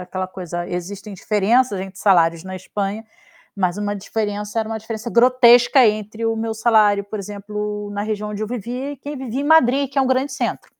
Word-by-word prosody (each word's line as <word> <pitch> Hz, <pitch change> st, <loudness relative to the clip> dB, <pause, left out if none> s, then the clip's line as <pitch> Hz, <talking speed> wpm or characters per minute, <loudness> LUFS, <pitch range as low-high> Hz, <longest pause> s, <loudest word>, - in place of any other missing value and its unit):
aquela 185 Hz, +1 st, -4 dB
coisa, 175 Hz, -2 st, -6 dB
existem 195 Hz, +4 st, -6 dB
diferenças 210 Hz, +3 st, +1 dB
entre 190 Hz, 0 st, -8 dB
salários 170 Hz, -4 st, +3 dB
na 185 Hz, 0 st, -7 dB
Espanha, 200 Hz, +3 st, -4 dB, 0.5 s
mas 185 Hz, -2 st, 0 dB
uma 205 Hz, 0 st, -2 dB
diferença, 210 Hz, +1 st, -3 dB
era 220 Hz, -1 st, -1 dB
uma 220 Hz, 0 st, -3 dB
diferença 220 Hz, +1 st, -6 dB
grotesca 245 Hz, +1 st, +6 dB
entre 215 Hz, +1 st, -2 dB
o 225 Hz, -, +1 dB
meu 225 Hz, 0 st, -3 dB
salário, 215 Hz, -3 st, +3 dB
por 205 Hz, +2 st, -6 dB
exemplo, 210 Hz, +1 st, -5 dB
na 205 Hz, 0 st, -3 dB
região 210 Hz, 0 st, -3 dB
onde 210 Hz, +1 st, -5 dB
eu -, -, -2 dB
vivi, 250 Hz, +5 st, -5 dB
que 290 Hz, +1 st, -5 dB
vivi 260 Hz, -1 st, -4 dB
em -, -, -3 dB
Madrid, 280 Hz, -3 st, +4 dB
que 275 Hz, -, -1 dB
é 270 Hz, -, +4 dB
um -, -, 0 dB
grande 260 Hz, +2 st, 0 dB
centro. 265 Hz, -, -3 dB
210 Hz, 195 wpm, -20 LUFS, 200-240 Hz, 0.5 s, grotesca